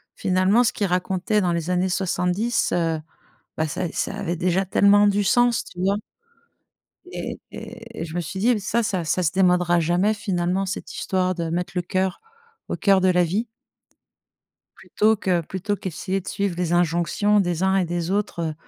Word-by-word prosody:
finalement, 190 Hz, +4 st, +3 dB
ce 235 Hz, -, +1 dB
qu'il 200 Hz, -, -1 dB
racontait 185 Hz, +3 st, 0 dB
dans 180 Hz, -2 st, +1 dB
les 170 Hz, 0 st, -2 dB
années 180 Hz, +1 st, +1 dB
70, 185 Hz, +5 st, 0 dB
heu, 165 Hz, -2 st, 0 dB, 0.6 s
beh 160 Hz, -, +1 dB
ça 155 Hz, -, -3 dB
ça -, -, -2 dB
avait 190 Hz, -4 st, -3 dB
déjà 180 Hz, +2 st, +1 dB
tellement 200 Hz, +2 st, +5 dB
du 205 Hz, 0 st, +2 dB
sens, 240 Hz, +3 st, +3 dB
tu 180 Hz, -, -12 dB
vois? 195 Hz, +2 st, +2 dB, 1.2 s
Et -, -, -5 dB
et 230 Hz, 0 st, -10 dB
et -, -, -2 dB
je 160 Hz, -1 st, -8 dB
me 175 Hz, -, 0 dB
suis 175 Hz, +3 st, -6 dB
dit, 235 Hz, +2 st, +3 dB
ça 220 Hz, +4 st, 0 dB
ça 190 Hz, -5 st, -1 dB
ça 170 Hz, +4 st, 0 dB
se 160 Hz, -, +2 dB
démodera 180 Hz, -2 st, +3 dB
jamais 175 Hz, +6 st, +2 dB
finalement, 190 Hz, -2 st, -1 dB
cette 190 Hz, -, -5 dB
histoire 185 Hz, -1 st, 0 dB
de 170 Hz, -2 st, -3 dB
mettre 175 Hz, +1 st, -2 dB
le 180 Hz, -, +1 dB
cœur 185 Hz, +1 st, -1 dB, 0.5 s
au -, -, -2 dB
cœur 195 Hz, -2 st, +3 dB
de 185 Hz, -, +3 dB
la 180 Hz, -1 st, +4 dB
vie 200 Hz, +8 st, -1 dB, 1.3 s
plutôt 220 Hz, +1 st, +1 dB
que 185 Hz, -4 st, 0 dB
plutôt 190 Hz, +5 st, -3 dB
qu'essayer 185 Hz, 0 st, -3 dB
de 185 Hz, -, -9 dB
suivre 200 Hz, -3 st, -1 dB
les 175 Hz, -1 st, 0 dB
injonctions 175 Hz, +5 st, +2 dB
des 175 Hz, -2 st, -1 dB
uns 190 Hz, 0 st, +3 dB
et 185 Hz, -2 st, +1 dB
des 175 Hz, 0 st, -3 dB
autres, 205 Hz, -3 st, -1 dB
heu, -, -, -7 dB
185 Hz, 185 wpm, -23 LUFS, 175-200 Hz, 1.3 s, tellement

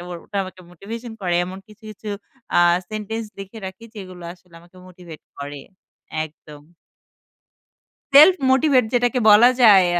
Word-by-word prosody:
ও -, -, -9 dB, 0.2 s
ওটা 200 Hz, -, -8 dB
আমাকে 185 Hz, 0 st, -12 dB
মোটিভেশন 225 Hz, +6 st, -9 dB
করে। 175 Hz, -1 st, -1 dB
এমন 190 Hz, +1 st, -8 dB
কিছু, 215 Hz, +2 st, -19 dB
কিছু 215 Hz, +1 st, -10 dB, 0.5 s
আ -, -, +5 dB, 0.3 s
সেন্টেন্স 215 Hz, +1 st, -5 dB
লিখে 195 Hz, +3 st, -9 dB
রাখি 190 Hz, +4 st, -10 dB
যেগুলো 185 Hz, -3 st, -10 dB
আসলে 175 Hz, -1 st, -25 dB
আমাকে 175 Hz, +2 st, -22 dB
মোটিভেট 175 Hz, -3 st, -13 dB, 0.2 s
করে। 145 Hz, 0 st, -7 dB, 0.6 s
একদম। 150 Hz, -1 st, -14 dB, 1.5 s
self-motivate 275 Hz, -5 st, +5 dB
যেটাকে 245 Hz, 0 st, +1 dB
বলা 230 Hz, +4 st, +7 dB
যায় 195 Hz, -5 st, +7 dB
195 Hz, 130 wpm, -21 LUFS, 180-230 Hz, 1.5 s, বলা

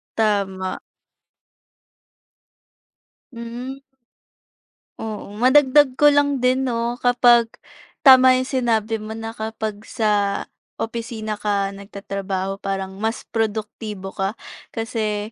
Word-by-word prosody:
Tama. 195 Hz, -4 st, -1 dB, 2.5 s
Hmm. 245 Hz, +3 st, -7 dB, 1.2 s
Oo. 215 Hz, -2 st, -6 dB
Madagdag 265 Hz, +1 st, +5 dB
ko 295 Hz, +2 st, +6 dB
lang 285 Hz, -2 st, +2 dB
din, 260 Hz, +1 st, +2 dB
'no, 235 Hz, 0 st, -2 dB
kapag 245 Hz, -1 st, +5 dB, 0.6 s
tama 260 Hz, -2 st, +8 dB
'yong 255 Hz, 0 st, -1 dB
sinabi 225 Hz, -4 st, 0 dB
mo 215 Hz, +1 st, -7 dB
na 225 Hz, 0 st, -5 dB
kapag 220 Hz, -2 st, -5 dB
sa 205 Hz, -2 st, 0 dB, 0.4 s
opisina 225 Hz, -2 st, -4 dB
ka 205 Hz, -1 st, 0 dB
nag-tatrabaho 195 Hz, -1 st, -5 dB
parang 195 Hz, -1 st, -4 dB
mas 220 Hz, +2 st, -2 dB
produktibo 215 Hz, -2 st, -3 dB
ka, 195 Hz, +1 st, -2 dB, 0.4 s
kasi 220 Hz, -2 st, -3 dB
225 Hz, 95 wpm, -21 LUFS, 205-245 Hz, 2.5 s, tama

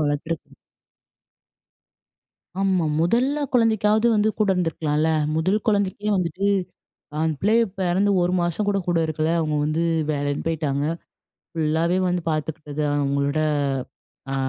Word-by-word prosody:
வளர்த்துருக்கு. 145 Hz, +2 st, -3 dB, 2.1 s
ஆமா. 190 Hz, -3 st, +2 dB, 0.2 s
மொதல்ல 250 Hz, -, +1 dB
குழந்தைக்காவது 220 Hz, -1 st, +3 dB
வந்து 210 Hz, +1 st, +3 dB
கூட 210 Hz, -2 st, +2 dB
இருந்துருக்கலாள்ல, 160 Hz, -3 st, 0 dB, 0.3 s
முதல் 185 Hz, +6 st, +2 dB
குழந்தைக்கே 205 Hz, 0 st, 0 dB
வந்துட்டு 185 Hz, +2 st, -1 dB, 0.8 s
அந்த 160 Hz, -1 st, 0 dB
பிள்ளைக 225 Hz, +4 st, +4 dB, 0.2 s
பிறந்து 190 Hz, +2 st, +2 dB
ஒரு 175 Hz, +1 st, +1 dB
மாசம் 175 Hz, +4 st, -1 dB
கூட, 200 Hz, -, +1 dB
கூட 175 Hz, -1 st, +2 dB
இருக்கல. 155 Hz, 0 st, -1 dB
அவங்க 155 Hz, -2 st, 0 dB
வந்து 155 Hz, +2 st, 0 dB, 0.3 s
வேலைன்னு 145 Hz, -1 st, -2 dB
பேயிட்டாங்க. 145 Hz, -3 st, -1 dB, 0.7 s
ஃபுல்லாவே 165 Hz, +2 st, +1 dB
வந்து 175 Hz, -1 st, -1 dB
பார்த்துக்கிட்டது 155 Hz, -1 st, -3 dB
அவங்களோட 140 Hz, +1 st, 0 dB, 0.9 s
அ -, -, -1 dB
170 Hz, 110 wpm, -23 LUFS, 155-200 Hz, 2.1 s, பிள்ளைக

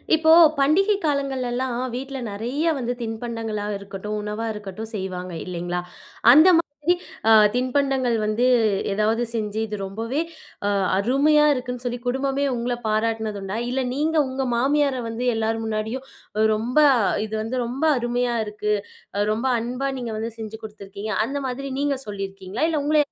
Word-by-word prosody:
இப்போ, 320 Hz, 0 st, +4 dB, 0.3 s
பண்டிகை 385 Hz, +9 st, +4 dB
காலங்களலாம், 260 Hz, -3 st, -1 dB, 0.2 s
வீட்ல 270 Hz, +1 st, -5 dB
நெறைய 240 Hz, +9 st, -3 dB
வந்து, 245 Hz, -1 st, -2 dB
தின்பண்டங்களா 225 Hz, -2 st, -4 dB
இருக்கட்டும், 200 Hz, +1 st, -6 dB
உணவா 210 Hz, +2 st, -4 dB
இருக்கட்டும் 210 Hz, +1 st, -7 dB
செய்வாங்க, 185 Hz, -2 st, -4 dB
இல்லைங்களா. 175 Hz, 0 st, -3 dB, 0.5 s
அந்த 310 Hz, +7 st, +8 dB
மாதிரி, 300 Hz, +2 st, 0 dB, 0.4 s
அ -, -, +7 dB, 0.2 s
தின்பண்டங்கள் 255 Hz, -2 st, +1 dB
வந்து 215 Hz, +4 st, +1 dB, 0.5 s
ஏதாவது 220 Hz, +3 st, +1 dB
செஞ்சு, 215 Hz, -1 st, -2 dB
இது 210 Hz, -, -4 dB
ரொம்பவே 230 Hz, +9 st, -2 dB, 0.5 s
அ -, -, +2 dB, 0.3 s
அருமையா 285 Hz, +8 st, +4 dB
இருக்குன்னு 250 Hz, -1 st, -4 dB
சொல்லி, 245 Hz, 0 st, -2 dB
குடும்பமே 270 Hz, +2 st, 0 dB
உங்ள 245 Hz, +1 st, -1 dB
பாராட்டினது 220 Hz, -1 st, -1 dB
உண்டா? 195 Hz, +3 st, -3 dB
இல்ல, 260 Hz, +1 st, 0 dB
நீங்க 315 Hz, +3 st, 0 dB
உங்க 260 Hz, 0 st, -2 dB
மாமியார 280 Hz, +2 st, +2 dB
வந்து 230 Hz, +2 st, -4 dB
எல்லார் 225 Hz, 0 st, -1 dB
முன்னாடியும், 220 Hz, +4 st, -3 dB, 0.5 s
"ரொம்ப 235 Hz, +6 st, -3 dB, 0.5 s
இது 220 Hz, -, -9 dB
வந்து 250 Hz, +3 st, -3 dB
ரொம்ப 260 Hz, +6 st, -2 dB
அருமையா 240 Hz, 0 st, 0 dB
இருக்கு. 210 Hz, 0 st, -2 dB, 0.6 s
ரொம்ப 235 Hz, +4 st, -1 dB
அன்பா 250 Hz, +4 st, -2 dB
நீங்க 235 Hz, -2 st, -4 dB
வந்து, 225 Hz, +1 st, -3 dB
செஞ்சு 220 Hz, 0 st, -6 dB
குடுத்துருக்கீங்க." 205 Hz, 0 st, -6 dB
அந்த 275 Hz, +4 st, -3 dB
மாதிரி, 275 Hz, +2 st, -4 dB
நீங்க 285 Hz, -1 st, +1 dB
சொல்லிருக்கீங்களா? 195 Hz, +3 st, -3 dB
இல்ல, 315 Hz, -, 0 dB
உங்கள 305 Hz, +1 st, +3 dB
235 Hz, 140 wpm, -23 LUFS, 215-270 Hz, 0.6 s, அந்த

